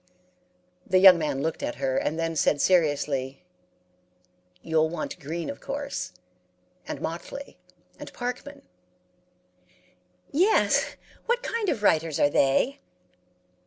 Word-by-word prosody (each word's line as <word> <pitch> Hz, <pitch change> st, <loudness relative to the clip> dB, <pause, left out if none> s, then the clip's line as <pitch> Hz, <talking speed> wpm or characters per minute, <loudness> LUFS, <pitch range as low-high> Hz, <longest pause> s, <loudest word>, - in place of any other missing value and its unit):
"The 185 Hz, -, +2 dB
young 185 Hz, -2 st, +8 dB
man 145 Hz, -3 st, -2 dB
looked 160 Hz, 0 st, -2 dB
at -, -, -3 dB
her, 135 Hz, 0 st, -1 dB
and 155 Hz, -, -1 dB
then 165 Hz, 0 st, -2 dB
said 145 Hz, -1 st, +2 dB
seriously, 145 Hz, -5 st, +1 dB, 1.2 s
'You'll 160 Hz, -1 st, +2 dB
want 170 Hz, -, -5 dB
Green, 165 Hz, +4 st, -5 dB
of 280 Hz, -, -6 dB
course, 280 Hz, -, -4 dB, 0.8 s
and -, -, -5 dB
Motley, 175 Hz, +12 st, -7 dB, 0.4 s
and -, -, -9 dB
Parkman.' 250 Hz, +4 st, -6 dB, 1.7 s
"'Yes. 375 Hz, +9 st, +2 dB, 0.3 s
What 480 Hz, +1 st, +1 dB
kind 455 Hz, -4 st, -1 dB
of 210 Hz, -, -2 dB
writers 160 Hz, -5 st, +2 dB
are 145 Hz, -, +4 dB
they?' 190 Hz, -, +2 dB
165 Hz, 115 wpm, -26 LUFS, -, 1.7 s, young